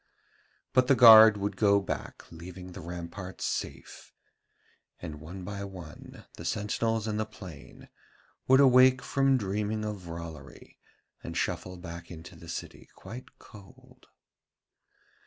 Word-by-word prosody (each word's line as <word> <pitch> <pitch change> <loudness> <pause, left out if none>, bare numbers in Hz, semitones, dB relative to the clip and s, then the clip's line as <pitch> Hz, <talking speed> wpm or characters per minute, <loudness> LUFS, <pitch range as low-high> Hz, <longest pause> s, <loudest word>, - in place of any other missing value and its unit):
But 130 -1 +4
the 135 - +5
guard 110 -3 +9
would 100 0 -3
go 100 0 +4
back 95 - -6
leaving 90 +2 -10
the 90 - -9
ramparts 90 +3 -7
safe, - - -5 0.9
and 75 -3 -8
one 90 +5 -9
by 100 +1 -6
one 90 -6 -11
the - - -8
sentinels 110 +1 -1
in 105 -1 -2
the 110 - -1
plain 95 -8 -12 0.6
would 130 +1 +6
awake 130 -1 +6
from 135 -1 +2
dreaming 105 0 -2
of 100 -4 -6
Rollory 85 -1 -10 0.4
and - - -6
shuffle 90 0 -3
back 85 -1 -9
into 80 -2 -11
the - - -13
city - - -8
quite 115 +7 -11
cold. 100 -3 -17
100 Hz, 130 wpm, -28 LUFS, 90-110 Hz, 0.9 s, guard